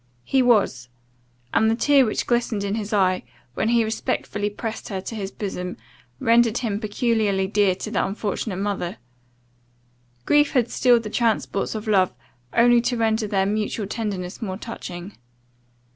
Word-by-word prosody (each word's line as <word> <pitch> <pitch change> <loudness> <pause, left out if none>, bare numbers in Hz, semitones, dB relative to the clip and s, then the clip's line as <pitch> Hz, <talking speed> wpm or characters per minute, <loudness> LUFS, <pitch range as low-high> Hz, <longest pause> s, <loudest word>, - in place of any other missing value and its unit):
He 265 - +2
was; 200 - +2 0.6
and 220 - +4
the 225 - +2
tear 275 0 +4
which 215 - -1
glistened 235 -4 0
in 200 0 -1
his 215 0 -3
eye, 185 -3 +2 0.3
when 220 - 0
he 235 -1 +4
respectfully 210 -1 -2
pressed 220 +2 -6
her 195 -3 -3
to 190 - -7
his 200 -3 -4
bosom, 180 -3 -5 0.4
rendered 230 0 +4
him 215 -5 -2
peculiarly 215 -3 +1
dear 200 -1 +2
to - - -6
the - - +1
unfortunate 200 0 -3
mother. 195 -3 -2 1.3
Grief 295 0 +3
had 245 -3 +2
stilled 240 -2 +4
the 210 - -6
transports 225 -3 0
of 215 +1 -5
love, 190 -4 +3 0.4
only 240 0 +5
to 245 0 -1
render 220 -1 +1
their 195 -2 +1
mutual 210 +1 -1
tenderness 200 -3 -4
more 190 -4 -3
touching. 190 -4 -8
215 Hz, 155 wpm, -23 LUFS, 195-230 Hz, 1.3 s, only